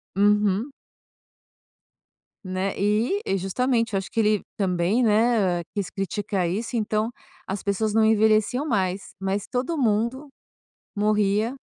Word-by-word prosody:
Uhum. 210 Hz, +4 st, +2 dB, 1.7 s
Né, 185 Hz, +1 st, -2 dB
eh, 215 Hz, -, +1 dB
e 195 Hz, -, 0 dB
justamente 230 Hz, +5 st, 0 dB
eu -, -, +2 dB
acho 190 Hz, -, -5 dB
que -, -, -2 dB
ele 210 Hz, -2 st, +3 dB
também, 190 Hz, +4 st, +1 dB
né, 210 Hz, -5 st, +2 dB
quis 200 Hz, -2 st, -2 dB
criticar 195 Hz, -1 st, -2 dB
isso, 220 Hz, +7 st, -2 dB
então, 215 Hz, +1 st, 0 dB, 0.4 s
as 195 Hz, +1 st, -4 dB
pessoas 205 Hz, +1 st, 0 dB
não 220 Hz, 0 st, +4 dB
envelheciam 220 Hz, +4 st, +3 dB
mais, 195 Hz, -7 st, -1 dB
mas 195 Hz, +1 st, -2 dB
todo 265 Hz, +6 st, -2 dB
mundo 235 Hz, +3 st, 0 dB, 0.7 s
morria, 210 Hz, +2 st, +1 dB
210 Hz, 125 wpm, -24 LUFS, 195-230 Hz, 1.7 s, não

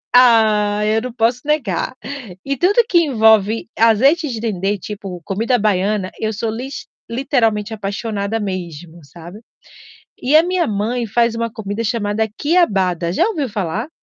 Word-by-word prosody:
Ai, 215 Hz, -3 st, +4 dB
eu -, -, +1 dB
não 250 Hz, 0 st, -6 dB
posso 235 Hz, +1 st, +1 dB
negar. 260 Hz, -, -1 dB, 0.5 s
E 275 Hz, 0 st, -1 dB
tudo 405 Hz, -, +3 dB
que 350 Hz, -, +4 dB
envolve 220 Hz, -, +3 dB
azeite 270 Hz, +9 st, +4 dB
de 235 Hz, -3 st, -4 dB
dendê, 205 Hz, -2 st, -1 dB
tipo, 195 Hz, -2 st, -7 dB
comida 225 Hz, +6 st, 0 dB
baiana, 200 Hz, -1 st, 0 dB
eu 220 Hz, 0 st, -1 dB
sou 220 Hz, +2 st, -3 dB
lis 255 Hz, +5 st, -6 dB, 0.2 s
literalmente 230 Hz, -4 st, 0 dB
apaixonada 205 Hz, +1 st, -3 dB
mesmo, 175 Hz, -4 st, -6 dB
sabe. 170 Hz, +6 st, -12 dB, 0.8 s
E 275 Hz, +4 st, +3 dB
a 315 Hz, -, +7 dB
minha 355 Hz, -1 st, 0 dB
mãe 225 Hz, +4 st, -2 dB
faz 235 Hz, +2 st, +1 dB
uma 230 Hz, 0 st, -2 dB
comida 215 Hz, -1 st, -5 dB
chamada 220 Hz, 0 st, -1 dB
quiabada, 190 Hz, -, +1 dB
já -, -, +2 dB
ouviu 310 Hz, -, -2 dB
falar? 210 Hz, -, -3 dB
220 Hz, 145 wpm, -18 LUFS, 200-245 Hz, 0.8 s, a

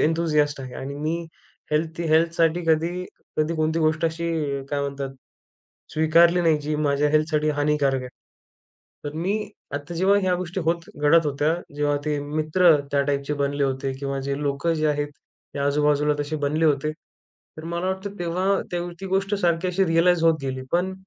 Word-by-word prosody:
Enthusiast 150 Hz, -3 st, +1 dB
आहे 130 Hz, -2 st, -8 dB
आणि 140 Hz, +1 st, -6 dB
मी 155 Hz, +3 st, -2 dB, 0.6 s
health 160 Hz, +2 st, 0 dB
हेल्थसाठी 165 Hz, +1 st, +3 dB
कधी 160 Hz, +2 st, +2 dB, 0.5 s
कधी 155 Hz, +2 st, 0 dB
कोणती 155 Hz, +1 st, +1 dB
गोष्ट 155 Hz, +1 st, +1 dB
अशी 165 Hz, +1 st, -3 dB, 0.3 s
अ, -, -, -8 dB
काय 145 Hz, -1 st, 0 dB
म्हणतात 140 Hz, -1 st, -3 dB, 0.8 s
स्वीकारली 165 Hz, +3 st, +4 dB
नाही 160 Hz, -3 st, +3 dB
जी 150 Hz, +1 st, -2 dB
माझ्या 145 Hz, -1 st, +1 dB
हेल्थसाठी 155 Hz, 0 st, +2 dB
हानिकारक 145 Hz, -2 st, +1 dB
आहे. 125 Hz, -, -7 dB, 1.0 s
तर 145 Hz, -, -4 dB
मी 200 Hz, +6 st, -2 dB, 0.2 s
आता 145 Hz, +4 st, -5 dB
जेव्हा 190 Hz, +4 st, +3 dB
ह्या 185 Hz, -1 st, +2 dB
गोष्टी 180 Hz, +1 st, -4 dB
होत 165 Hz, +1 st, -1 dB
घडत 155 Hz, +2 st, +5 dB
होत्या, 145 Hz, +3 st, +1 dB, 0.2 s
जेव्हा 145 Hz, 0 st, +1 dB
ते 150 Hz, -1 st, 0 dB
मित्र 155 Hz, +5 st, +2 dB, 0.2 s
त्या 140 Hz, -, +3 dB
टाईपचे 140 Hz, +1 st, -1 dB
बनले 140 Hz, 0 st, 0 dB
होते 135 Hz, 0 st, -1 dB
किंवा 140 Hz, 0 st, -3 dB
जे 140 Hz, +1 st, -2 dB
लोकं 145 Hz, +4 st, 0 dB
जे 155 Hz, 0 st, 0 dB
आहेत, 145 Hz, 0 st, 0 dB, 0.5 s
हे 140 Hz, -, -3 dB
आजूबाजूला 150 Hz, +1 st, +2 dB
तसे 145 Hz, +2 st, -2 dB
बनले 155 Hz, +3 st, +1 dB
होते. 150 Hz, -1 st, +2 dB
तर 155 Hz, 0 st, -18 dB
मला 170 Hz, +2 st, -3 dB
वाटतं 190 Hz, +1 st, -4 dB
तेव्हा 185 Hz, +3 st, 0 dB
ती 175 Hz, +2 st, -4 dB
गोष्ट 195 Hz, +2 st, 0 dB
सारखी 175 Hz, -2 st, +1 dB
अशी 190 Hz, +2 st, +2 dB
रियलाइज 165 Hz, +1 st, +3 dB
होत 165 Hz, -1 st, +5 dB
गेली. 130 Hz, -1 st, -3 dB
पण 180 Hz, +2 st, +1 dB
155 Hz, 170 wpm, -24 LUFS, 145-170 Hz, 1.0 s, घडत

